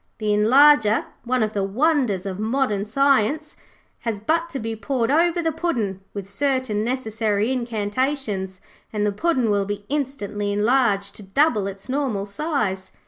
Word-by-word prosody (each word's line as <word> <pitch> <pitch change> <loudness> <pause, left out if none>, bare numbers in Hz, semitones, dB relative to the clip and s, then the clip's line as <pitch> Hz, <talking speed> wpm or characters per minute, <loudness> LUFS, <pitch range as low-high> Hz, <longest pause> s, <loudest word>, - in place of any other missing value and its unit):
The 215 -1 0
Enlarger, 225 +1 +5 0.2
one 250 -1 +1
of 215 0 -2
the 200 - 0
wonders 235 - +1
of 195 0 -4
modern 220 -3 0
science, 275 +4 +1 0.4
has 225 -3 -3
but 330 +10 0
to 280 - -5
be 225 -2 -4
poured 245 +1 -1
over 340 +2 +2
the 325 - +1
puddin', 235 - -2
with 200 -2 -6
certain 255 -1 0
necessary 220 -3 -1
incantations, 225 -4 -2 0.3
and 210 -1 -1
the 210 - +1
puddin' 255 -1 +1
will 200 -1 +1
be 205 0 -5
instantly 215 -8 -2
enlarged 205 -2 +2
to - - -7
double 210 0 +1
its 195 0 -8
normal 260 -7 -1
size.' 200 - -2
220 Hz, 150 wpm, -23 LUFS, 205-275 Hz, 0.4 s, Enlarger